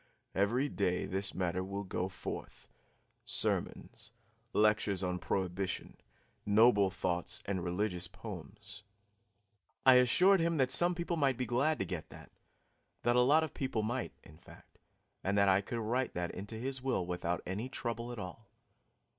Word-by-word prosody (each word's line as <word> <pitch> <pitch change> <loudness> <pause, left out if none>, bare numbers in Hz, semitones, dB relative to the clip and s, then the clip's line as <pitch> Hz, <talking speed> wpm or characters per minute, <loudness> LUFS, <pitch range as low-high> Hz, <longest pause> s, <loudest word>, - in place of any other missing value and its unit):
Every 115 +8 +2
day 95 -8 0
this 95 +1 -3
matter 90 0 -1
will 100 +2 -4
go 95 -1 -2
forth 95 - -7 0.6
sermons, 115 -1 -1 0.4
lectures 105 -3 +2
on 90 0 -1
prohibition, 95 0 -2 0.5
noble 105 -1 +5
thoughts 90 -2 -1
and 95 -3 -2
religious 90 0 -1
poems." 100 +1 -9 1.0
I 130 -1 +9
assured 180 +11 +5
him 165 0 +1
that 130 -2 +2
some 175 +4 +3
people 170 0 -2
might 135 -5 +2
be 125 - -1
glad 135 +7 +1
to - - -2
get 90 -4 -5
that - - -13 0.7
that 120 0 +3
a 125 - +6
lot 150 +6 +5
of 155 - -4
people 130 -5 -2
might, 120 +4 -2
in 80 - -16
fact, - - -17 0.4
and 100 +1 0
that 100 -1 +5
I 95 +1 +4
could 120 +4 -5
write 120 +3 -1
that 90 -1 -2
into 100 +4 -7
his 130 +3 -3
will 130 -9 0
without 90 -1 -2
any 105 +8 -3
trouble 120 -1 -4
at 120 - -7
all. 100 +2 -8
105 Hz, 155 wpm, -33 LUFS, 95-125 Hz, 1.0 s, I